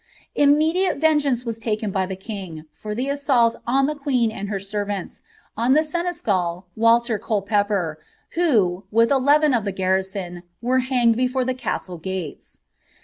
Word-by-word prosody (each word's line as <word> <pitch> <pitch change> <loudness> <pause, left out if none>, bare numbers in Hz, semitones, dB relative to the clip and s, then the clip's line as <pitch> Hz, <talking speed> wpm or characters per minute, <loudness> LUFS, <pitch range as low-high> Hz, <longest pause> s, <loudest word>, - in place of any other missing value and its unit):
Immediate 310 +6 +3
vengeance 285 -5 +2
was 230 -1 -4
taken 215 -2 -2
by 190 -1 0
the 190 - -4
king, 190 -6 -7
for 210 0 -6
the 250 +4 -1
naitanli 270 -5 +2
am 270 +3 +3
tt 300 0 -4
queen 250 -5 +1
and 205 -2 -6
her 205 - -1
servants, 200 0 -4 0.3
on 235 +4 +2
the 310 +2 +4
seneschal, 215 - -2
Walter 230 0 +3
Colepeppot, 205 -6 0 0.4
vIm, 215 - +2
wtt 230 +3 +3
eleven 285 +2 +4
of 235 -4 +1
the 200 - -2
garrison, 190 -1 -2 0.2
were 255 +2 +1
hanged 250 -3 +2
before 255 +1 0
the 255 - 0
castle 205 -8 -4
gataa. 180 - -6
230 Hz, 150 wpm, -22 LUFS, 195-265 Hz, 0.4 s, the